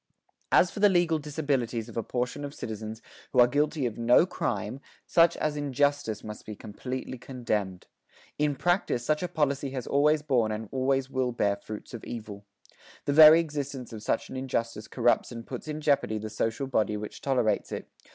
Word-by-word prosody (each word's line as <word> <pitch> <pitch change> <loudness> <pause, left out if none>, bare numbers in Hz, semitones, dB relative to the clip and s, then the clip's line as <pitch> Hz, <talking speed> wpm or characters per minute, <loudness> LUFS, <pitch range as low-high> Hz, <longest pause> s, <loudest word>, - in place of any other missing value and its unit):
As 180 - +5
for - - -7
the 205 0 +6
legal 175 -4 +2
disabilities 140 -6 -2
of 115 - -11
a 115 - 0
portion 125 +5 -3
of 145 0 -6
citizens 110 0 -6 0.3
who 130 - +2
are 120 - +9
guilty 145 +2 0
of 120 -1 -3
no 120 +7 +5
crime, 110 - -3 0.3
such 170 0 +4
as 155 -1 -1
injustice 145 -4 0
must 105 0 -8
be 105 - -7
completely 125 +5 -6
condemned. 110 -8 -3 0.5
In 150 -1 +2
practice, 175 -7 0
such 155 +2 +1
a 180 - -1
policy 140 -4 0
has 125 - -3
always 150 +2 +3
borne 125 -7 +2
and 110 0 -4
always 135 0 0
will 130 -2 0
bear 100 -4 +1
fruits 105 +3 -9
of 120 - -7
evil. 105 -3 -7 0.6
The 145 - +1
very 155 +2 +10
existence 145 -6 -5
of 110 - -7
such - - -1
an - - -6
injustice 115 -4 -3
corrupts 120 0 +1
and 115 -1 -7
puts 130 +3 -7
in 155 0 -4
jeopardy 140 -8 +2
the 110 0 -6
social 115 +4 -1
body 110 -5 0
which 105 0 -7
tolerates 125 -6 +1
it.... - - -5
130 Hz, 185 wpm, -28 LUFS, 110-145 Hz, 0.6 s, very